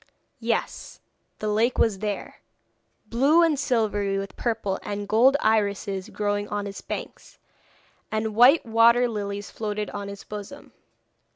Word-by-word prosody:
Yes, 230 0 -3 0.4
the 215 - -4
lake 220 +4 +1
was 205 -4 +2
there, 205 -1 -4 0.7
blue 275 +10 +4
and 310 -4 +2
silvery 210 -7 0
with 195 0 -5
purple 220 -5 -2
and 205 0 -5
gold 250 +7 +5
irises 200 -2 0
growing 205 0 -2
on 205 -1 -3
its 200 0 -7
banks, - - -7 0.7
and 215 0 -1
white 250 +8 +6
water 235 +2 +5
lilies 205 -2 -5
floated 210 -1 -4
on 200 -1 -5
its 200 0 -9
bosom. 210 +7 -9
215 Hz, 130 wpm, -25 LUFS, 205-235 Hz, 0.7 s, white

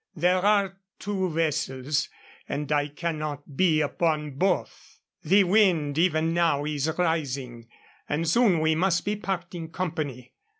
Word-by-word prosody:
There 180 +2 +2
are 200 -2 +2 0.2
two 195 -2 -2
vessels, 150 -3 -1 0.4
and 150 +1 -3
I 145 -1 +2
cannot 150 -2 -5
be 160 -1 +3
upon 150 0 0
both. 180 +7 -2 0.3
The 195 +6 +5
wind 175 -7 +2
even 165 -2 +2
now 165 -4 +2
is 150 +1 -1
rising, 135 -9 -2 0.4
and 160 +3 -1
soon 185 -2 +3
we 160 0 +3
must 170 +1 +1
be 210 - 0
parting 175 -5 -5
company. 155 -8 -4
160 Hz, 130 wpm, -26 LUFS, 145-180 Hz, 0.4 s, The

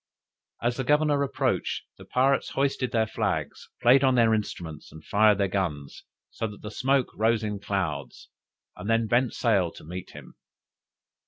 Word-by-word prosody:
As 120 0 0
the 130 - -1
governor 150 +1 +2
approached, 140 - -1 0.2
the - - -11
pirates 135 +2 +2
hoisted 135 -2 0
their 110 -3 +2
flags, 110 - -3
played 130 +3 +6
on 130 -1 +4
their 115 -2 +4
instruments, 85 -7 -4
and 80 - -13
fired 105 0 +4
their 100 -1 +1
guns, 85 -8 -3 0.3
so 115 - -3
that 105 -1 -11
the 105 - -6
smoke 135 +2 +1
rose 110 0 +2
in 105 -1 -3
clouds, 95 -6 -4 0.5
and 90 +4 -7
then 115 0 +3
bent 120 +2 +1
sail 100 -8 +2
to - - -13
meet 90 +3 -7
him. - - -12
110 Hz, 165 wpm, -26 LUFS, 100-130 Hz, 0.5 s, played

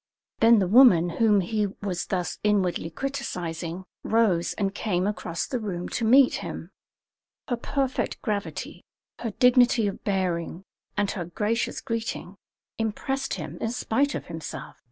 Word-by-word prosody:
Then 230 +1 +7
the 190 -3 +2
woman 195 -6 +7
whom 210 -3 +5
he 210 +3 0 0.2
was 185 -3 -2
thus 180 -2 -2
inwardly 195 -5 +1
criticising 175 - -4 0.2
rose 210 -7 +2
and 195 -2 -1
came 185 -4 -1
across 180 -5 -2
the 250 - -3
room 180 -5 -4
to 235 - -2
meet 255 +4 +6
him. - - -7 0.8
Her 245 - 0
perfect 265 +2 -2
gravity, 210 -3 -4 0.4
her 235 - -2
dignity 245 0 +4
of 200 - -3
bearing, 185 -3 -1 0.3
and 205 -1 +1
her 180 -5 -4
gracious 210 +7 -1
greeting, 225 -5 -4 0.4
impressed 270 +5 -2
him - - -7
in 225 - 0
spite 265 +4 0
of - - -5
himself. 165 -2 -7
210 Hz, 140 wpm, -26 LUFS, 180-235 Hz, 0.8 s, Then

